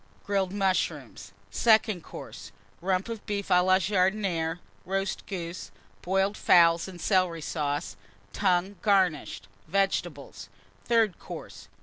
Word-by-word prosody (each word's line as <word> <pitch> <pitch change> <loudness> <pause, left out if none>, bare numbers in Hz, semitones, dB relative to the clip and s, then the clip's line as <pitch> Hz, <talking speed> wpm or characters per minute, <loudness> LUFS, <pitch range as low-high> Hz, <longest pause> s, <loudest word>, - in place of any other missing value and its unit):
Grilled 195 -2 0
Mushrooms. 185 - -2 0.2
SECOND 215 -5 +3
COURSE. - - -10 0.3
Rump 185 +2 0
of 230 -2 -6
Beef 200 -1 -3
à 180 -1 +5
la 185 0 +5
Jardinière. 185 -3 0 0.3
Roast 195 +1 -2
Goose. 175 -3 -6 0.3
Boiled 195 +2 +1
Fowls 170 -3 +4
and 185 -2 -10
Celery 175 -3 +1
Sauce. 145 -3 -3 0.4
Tongue, 190 0 +1
garnished. 185 - +1 0.2
Vegetables. 175 -5 -2 0.4
THIRD 225 -6 +2
COURSE. - - -9
185 Hz, 110 wpm, -27 LUFS, 170-200 Hz, 0.4 s, à